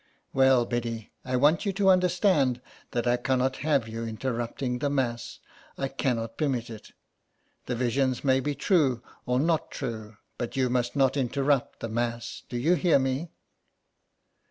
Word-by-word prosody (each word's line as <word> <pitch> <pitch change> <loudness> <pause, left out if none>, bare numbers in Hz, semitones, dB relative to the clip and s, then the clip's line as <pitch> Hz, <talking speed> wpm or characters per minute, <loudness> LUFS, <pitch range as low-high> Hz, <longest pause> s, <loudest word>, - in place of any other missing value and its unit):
'' - - -44
Well, 130 -2 +5
Biddy, 115 -2 -3
I 130 0 -2
want 145 +6 +4
you 200 - 0
to 195 0 +3
understand 180 - +3 0.3
that 120 - -2
I 120 0 +3
cannot 130 +1 0
have 140 -5 +1
you 115 +1 -5
interrupting 120 +2 -3
the 145 - 0
Mass. 125 -4 -2 0.4
I 135 - -2
cannot 115 -2 -2
III - - +4
SOME - - +1
PARISHIONERS. 120 -1 -3
permit 110 - -7
it - - -26 0.7
The 125 - -1
visions 130 +1 0
may 135 -1 +3
be 145 +2 -2
true, 135 - +2 0.2
or 125 0 +2
not 160 +2 +1
true, 110 -5 -6 0.2
but 120 - -4
you 130 -2 +2
must 125 0 0
not 135 0 +3
interrupt 135 +1 0
the 115 - -3
Mass. 120 +1 -3
Do 120 - -3
you 155 +9 +3
hear 175 -3 +4
me 135 +5 -1
130 Hz, 175 wpm, -27 LUFS, 120-140 Hz, 0.7 s, Well